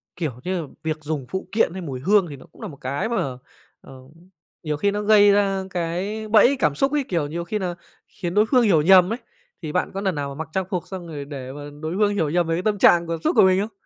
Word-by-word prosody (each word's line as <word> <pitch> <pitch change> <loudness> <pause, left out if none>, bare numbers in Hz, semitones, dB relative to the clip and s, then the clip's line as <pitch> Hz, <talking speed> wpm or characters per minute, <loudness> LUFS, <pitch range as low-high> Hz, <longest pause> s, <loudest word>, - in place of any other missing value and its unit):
kiểu, 160 -6 -2
như 185 -1 -2
là 155 - -8 0.2
việc 155 -1 -2
dùng 150 -3 -3
phụ 190 -1 -4
kiện 210 -5 +1
hay 190 - -6
mùi 135 -6 -5
hương 195 +5 +3
thì 140 - -7
nó 130 - -14
cũng - - -18
nà 215 - -5
một 145 - -11
cái 140 - -2
mà, 145 - -2 0.4
ờ, 130 -1 -13 0.6
nhiều 150 -1 -2
khi 200 +7 +1
nó 205 +1 -2
gây 205 -1 +6
ra 195 -1 +1
cái 185 +5 -3
bẫy 225 +5 +5
cảm 150 -1 +1
xúc 275 - +1
ấy, 295 -2 +1
kiểu, 165 -5 -1
nhiều 170 +3 -4
khi 210 +5 -3
nà 180 -2 -3 0.3
khiến 175 -3 -6
đối 210 +2 +4
phương 250 +1 +3
hiểu 170 -8 +4
nhầm 185 +4 +6
ấy, 240 - -5 0.4
thì 155 -3 -5
bạn 180 - -1
có 195 - -4
lần 190 -5 -1
nào 140 -1 -3
mà 140 - -8
mặc 160 0 -5
trang 190 -1 -1
phục 180 -3 -3
xong 185 -3 -7
rồi 145 -3 -6
để 135 -3 -7
mà 145 - -9 0.2
đối 160 +3 -3
hương 205 0 +2
hiểu 160 -6 0
nhầm 175 +1 +1
về 165 - 0
cái 175 - -2
tâm 210 -1 0
trạng 170 -3 +5
cảm 165 -1 -3
xúc - - 0
của - - +7
mình 190 0 +4
không? 215 +2 -4
180 Hz, 275 wpm, -22 LUFS, 155-205 Hz, 0.6 s, của